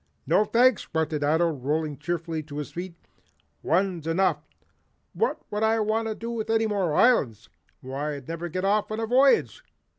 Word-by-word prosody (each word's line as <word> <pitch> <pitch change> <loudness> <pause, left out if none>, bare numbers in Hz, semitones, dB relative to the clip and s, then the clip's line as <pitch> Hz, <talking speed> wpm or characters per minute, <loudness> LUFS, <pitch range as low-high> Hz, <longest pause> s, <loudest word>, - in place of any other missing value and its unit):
"No, 210 - +3
thanks," 245 +1 +3
grunted 155 -2 -1
Ato, 160 +3 +2
rolling 150 +2 -2
cheerfully 165 +1 -3
to 145 -1 -9
his 150 - -5
feet. 175 0 -6 0.7
"One's 175 -2 0
enough. 185 +4 +1 0.7
What 460 - -1
would 210 0 -2
I 220 +1 +2
want 220 +1 0 0.2
with 230 -2 -4
any 225 0 +2
more 195 -7 0
islands? 120 - +2 0.3
Why 140 +3 -4
I'd 140 -3 -10
never 165 +1 -5
get 185 +3 -3
off 205 +1 +1
on 215 - -3
a 225 - -1
voyage. 260 +4 +3
175 Hz, 160 wpm, -26 LUFS, 155-215 Hz, 0.7 s, No